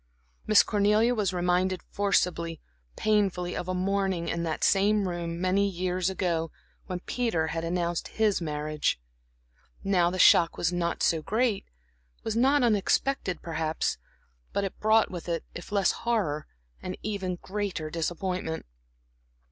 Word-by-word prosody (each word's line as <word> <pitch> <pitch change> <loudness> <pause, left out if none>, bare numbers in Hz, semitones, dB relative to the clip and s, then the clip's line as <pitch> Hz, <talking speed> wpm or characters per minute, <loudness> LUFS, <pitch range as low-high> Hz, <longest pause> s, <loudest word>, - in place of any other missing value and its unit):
Miss 215 -1 +7
Cornelia 210 +3 +3
was 210 -5 0
reminded 180 +1 0
forcibly, 175 -5 0 0.4
painfully, 195 -4 +1
of 180 - -4
a 185 - -1
morning 190 -2 0
in 170 - -1
that 160 -2 -2
same 200 0 +3
room 170 -1 -4
many 190 +2 +2
years 180 0 -1
ago, 170 -4 -1 0.4
when 180 -1 -4
Peter 200 -11 -1
had 165 +1 -3
announced 170 0 -1
his 215 -4 +1
marriage. 150 - -1 0.8
Now 180 -3 +3
the 185 - -4
shock 170 -1 +6
was 175 +1 0
not 170 -1 -1
so 165 -2 +2
great, 220 +3 0 0.6
was 220 - -2
not 270 +4 +4
unexpected, 215 - +1
perhaps; 160 -1 -1 0.5
but 200 - 0
it 195 - -5
brought 220 +1 +3
with 175 -1 -6
it, 165 -1 -1
if 175 - -9
less 200 -3 +3
horror, 195 -11 -1 0.3
an 185 0 -4
even 195 -4 -2
greater 185 -4 -4
disappointment. 170 0 -3
185 Hz, 140 wpm, -28 LUFS, 170-205 Hz, 0.8 s, Miss